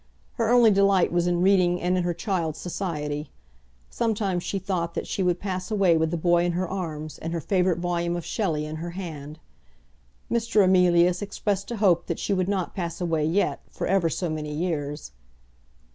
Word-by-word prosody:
Her 230 Hz, -2 st, 0 dB
only 240 Hz, -2 st, +6 dB
delight 195 Hz, -2 st, +3 dB
was 175 Hz, 0 st, +1 dB
in 175 Hz, 0 st, +1 dB
reading 180 Hz, -2 st, +3 dB
and 180 Hz, +1 st, 0 dB
in 185 Hz, -, +1 dB
her 175 Hz, 0 st, 0 dB
child's 170 Hz, -6 st, -2 dB
society. 150 Hz, -5 st, -4 dB, 0.6 s
Sometimes 210 Hz, -6 st, -1 dB
she 195 Hz, -, -3 dB
thought 180 Hz, -3 st, -2 dB
that -, -, -2 dB
she -, -, -3 dB
would 180 Hz, -1 st, +1 dB
pass 185 Hz, -2 st, -4 dB
away 195 Hz, -6 st, +3 dB
with 160 Hz, 0 st, +1 dB
the 170 Hz, -, -2 dB
boy 175 Hz, +1 st, +3 dB
in 175 Hz, 0 st, 0 dB
her 180 Hz, +2 st, -1 dB
arms 155 Hz, -5 st, -5 dB
and 165 Hz, +1 st, -4 dB
her 170 Hz, -, -1 dB
favourite 180 Hz, 0 st, +1 dB
volume 175 Hz, 0 st, -1 dB
of 175 Hz, -, -5 dB
Shelley 160 Hz, -9 st, -1 dB
in 155 Hz, +1 st, -5 dB
her 170 Hz, +2 st, -5 dB
hand. 155 Hz, -5 st, -7 dB, 0.9 s
Mr. 230 Hz, -3 st, +3 dB
Emilius 180 Hz, -1 st, +4 dB
expressed 200 Hz, -1 st, -2 dB
a 240 Hz, -, -3 dB
hope 185 Hz, -5 st, +3 dB
that 170 Hz, -, -2 dB
she 200 Hz, -, -1 dB
would 185 Hz, -1 st, 0 dB
not 190 Hz, -3 st, -1 dB
pass 170 Hz, -3 st, -4 dB
away 165 Hz, -4 st, 0 dB
yet, 175 Hz, +6 st, +1 dB
for -, -, -4 dB
ever 185 Hz, -3 st, +2 dB
so 175 Hz, +3 st, -2 dB
many 155 Hz, -1 st, -4 dB
years. 150 Hz, -3 st, -3 dB
175 Hz, 190 wpm, -25 LUFS, 165-195 Hz, 0.9 s, only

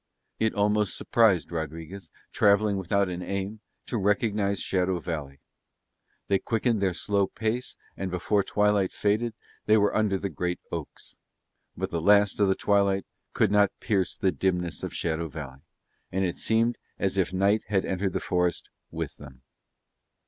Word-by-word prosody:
It 110 Hz, 0 st, +1 dB
almost 105 Hz, 0 st, +1 dB
surprised 105 Hz, -9 st, +3 dB
Rodriguez, 80 Hz, +4 st, -6 dB, 0.2 s
travelling 100 Hz, 0 st, +3 dB
without 100 Hz, +1 st, +1 dB
an 90 Hz, 0 st, -4 dB
aim, 100 Hz, +3 st, -4 dB, 0.3 s
to 120 Hz, -, -2 dB
recognise 105 Hz, 0 st, +1 dB
Shadow 90 Hz, -1 st, 0 dB
Valley. 75 Hz, -5 st, -5 dB, 0.9 s
They 100 Hz, -1 st, +2 dB
quickened 115 Hz, -1 st, 0 dB
their 95 Hz, -3 st, +1 dB
slow 100 Hz, -1 st, +1 dB
pace 110 Hz, +5 st, -3 dB, 0.2 s
and, 95 Hz, -, -3 dB
before 90 Hz, +3 st, +1 dB
twilight 105 Hz, -1 st, +2 dB
faded, 110 Hz, +2 st, 0 dB, 0.3 s
they 110 Hz, +1 st, +6 dB
were 105 Hz, -1 st, +2 dB
under 105 Hz, -3 st, +2 dB
the 100 Hz, 0 st, -4 dB
great 90 Hz, 0 st, -2 dB
oaks; -, -, -7 dB, 0.6 s
but -, -, -3 dB
the 85 Hz, -, -1 dB
last 100 Hz, +3 st, +4 dB
of 100 Hz, -, +4 dB
the 95 Hz, -, +3 dB
twilight 100 Hz, -1 st, +2 dB, 0.3 s
could -, -, +2 dB
not 100 Hz, -1 st, +3 dB
pierce 95 Hz, -5 st, 0 dB
the 95 Hz, -, +2 dB
dimness 90 Hz, +1 st, -1 dB
of -, -, -4 dB
Shadow 80 Hz, 0 st, -2 dB
Valley, 70 Hz, -4 st, -8 dB, 0.5 s
and 95 Hz, +1 st, 0 dB
it 90 Hz, -, -2 dB
seemed 115 Hz, +2 st, +1 dB, 0.2 s
as 95 Hz, 0 st, 0 dB
if 90 Hz, -2 st, +1 dB
night 100 Hz, +3 st, +2 dB
had 100 Hz, -2 st, +1 dB
entered 95 Hz, 0 st, -1 dB
the -, -, 0 dB
forest 90 Hz, -1 st, -1 dB, 0.2 s
with -, -, -5 dB
them. 65 Hz, 0 st, -13 dB
100 Hz, 155 wpm, -27 LUFS, 90-105 Hz, 0.9 s, they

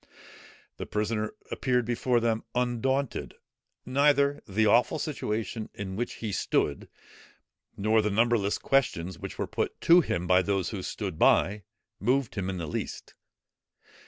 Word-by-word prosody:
The -, -, -6 dB
prisoner 105 Hz, 0 st, -2 dB, 0.2 s
appeared 125 Hz, -3 st, +1 dB
before 120 Hz, +1 st, +1 dB
them 115 Hz, -1 st, 0 dB
undaunted. 125 Hz, +2 st, -1 dB, 0.5 s
Neither 140 Hz, +1 st, +3 dB
the 110 Hz, +3 st, +1 dB
awful 115 Hz, +7 st, +4 dB
situation 115 Hz, -7 st, -3 dB
in 95 Hz, -2 st, -5 dB
which 120 Hz, +4 st, -3 dB
he 110 Hz, -2 st, -5 dB
stood, 70 Hz, -6 st, -1 dB, 0.9 s
nor 110 Hz, +2 st, +3 dB
the 105 Hz, -, 0 dB
numberless 110 Hz, -1 st, +2 dB
questions 95 Hz, -10 st, 0 dB
which -, -, -7 dB
were -, -, -1 dB
put -, -, -3 dB
to 175 Hz, +2 st, +7 dB
him 85 Hz, -, -2 dB
by 90 Hz, +1 st, +4 dB
those 95 Hz, -2 st, -1 dB
who 100 Hz, -, -5 dB
stood 95 Hz, -3 st, -5 dB
by, 100 Hz, -1 st, +3 dB, 0.3 s
moved 130 Hz, +4 st, +1 dB
him 95 Hz, -2 st, -3 dB
in 95 Hz, -, -3 dB
the 85 Hz, -, -4 dB
least. 75 Hz, -, -5 dB
110 Hz, 140 wpm, -28 LUFS, 100-125 Hz, 0.9 s, to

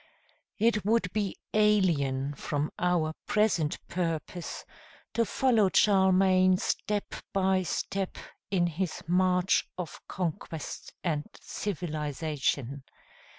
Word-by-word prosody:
It 215 Hz, -1 st, +2 dB
would 210 Hz, -3 st, +1 dB
be 205 Hz, -2 st, -1 dB, 0.2 s
alien 160 Hz, -11 st, +2 dB
from 145 Hz, +1 st, -2 dB
our 170 Hz, -3 st, +1 dB
present 200 Hz, -8 st, +2 dB
purpose 170 Hz, 0 st, -3 dB, 0.5 s
to 230 Hz, -, +2 dB
follow 230 Hz, -7 st, +3 dB
Charlemagne 190 Hz, -2 st, +5 dB
step 205 Hz, +2 st, -2 dB, 0.2 s
by 190 Hz, -1 st, +3 dB
step 190 Hz, +1 st, -2 dB, 0.3 s
in 185 Hz, -3 st, +2 dB
his 175 Hz, +1 st, -3 dB
march 180 Hz, +1 st, +3 dB
of 180 Hz, -3 st, -6 dB
conquest 165 Hz, -3 st, -4 dB
and 155 Hz, -4 st, -1 dB
civilization. 150 Hz, -, -2 dB
180 Hz, 95 wpm, -29 LUFS, 155-195 Hz, 0.5 s, Charlemagne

